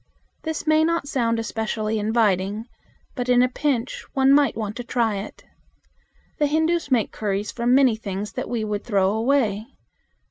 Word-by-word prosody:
This 320 Hz, 0 st, -4 dB
may 310 Hz, 0 st, +4 dB
not 335 Hz, -3 st, 0 dB
sound 235 Hz, -5 st, 0 dB
especially 220 Hz, -1 st, -2 dB
inviting, 210 Hz, -1 st, +1 dB, 0.5 s
but 250 Hz, -2 st, -4 dB
in 245 Hz, 0 st, +5 dB
a -, -, +4 dB
pinch 255 Hz, -2 st, -2 dB
one 270 Hz, 0 st, +4 dB
might 285 Hz, -5 st, +3 dB
want 215 Hz, -1 st, -3 dB
to 245 Hz, -, -4 dB
try 230 Hz, -3 st, 0 dB
it. 195 Hz, +2 st, -8 dB, 1.0 s
The 295 Hz, -, +3 dB
Hindus 320 Hz, +1 st, +1 dB
make 245 Hz, -5 st, +1 dB
curries 205 Hz, -1 st, -2 dB
from 240 Hz, +1 st, +2 dB
many 265 Hz, -4 st, +5 dB
things 205 Hz, -1 st, -5 dB
that -, -, -5 dB
we 235 Hz, -3 st, -1 dB
would 210 Hz, -1 st, -3 dB
throw 195 Hz, -4 st, +2 dB
away. 220 Hz, -2 st, +1 dB
230 Hz, 165 wpm, -23 LUFS, 210-275 Hz, 1.0 s, in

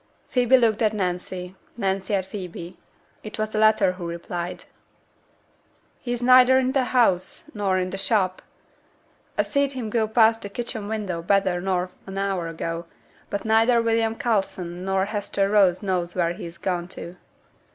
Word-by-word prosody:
Phoebe 250 Hz, 0 st, +4 dB
looked 225 Hz, -3 st, +2 dB
at 215 Hz, -1 st, +3 dB
Nancy, 180 Hz, -1 st, -3 dB, 0.2 s
Nancy 195 Hz, -1 st, -1 dB
at 190 Hz, -1 st, -1 dB
Phoebe. 180 Hz, -2 st, -7 dB, 0.5 s
It 215 Hz, -, -8 dB
was 215 Hz, 0 st, -1 dB
the 215 Hz, -, -2 dB
latter 215 Hz, -3 st, +4 dB
who 180 Hz, -2 st, -6 dB
replied, 170 Hz, +1 st, -5 dB, 1.4 s
'He's 245 Hz, -1 st, -3 dB
neither 255 Hz, +1 st, +7 dB
i' 260 Hz, 0 st, +2 dB
t' 275 Hz, -, +2 dB
house 245 Hz, 0 st, +1 dB
nor 200 Hz, -4 st, 0 dB
i' 185 Hz, 0 st, 0 dB
t' 190 Hz, +1 st, -5 dB
shop. 195 Hz, -3 st, +1 dB, 1.0 s
A -, -, +4 dB
seed 280 Hz, -1 st, +1 dB
him 240 Hz, -5 st, -4 dB
go 220 Hz, -1 st, +1 dB
past 225 Hz, 0 st, +4 dB
t' 200 Hz, -, -6 dB
kitchen 220 Hz, -1 st, -4 dB
window 205 Hz, -6 st, -3 dB
better 190 Hz, 0 st, +1 dB
nor 180 Hz, -1 st, -1 dB, 0.2 s
an 195 Hz, 0 st, -6 dB
hour 195 Hz, -3 st, -1 dB
ago; 165 Hz, +1 st, -4 dB, 0.4 s
but 200 Hz, +1 st, -3 dB
neither 225 Hz, +2 st, +4 dB
William 225 Hz, -1 st, +1 dB
Coulson 190 Hz, -7 st, -2 dB
or 190 Hz, 0 st, +2 dB
Hester 200 Hz, -1 st, -1 dB
Rose 195 Hz, -3 st, +4 dB
knows 180 Hz, -3 st, -1 dB
where 170 Hz, -2 st, +1 dB
he's 170 Hz, -1 st, -8 dB
gone 175 Hz, -2 st, -2 dB
to. 180 Hz, -1 st, -8 dB
195 Hz, 160 wpm, -24 LUFS, 180-225 Hz, 1.4 s, neither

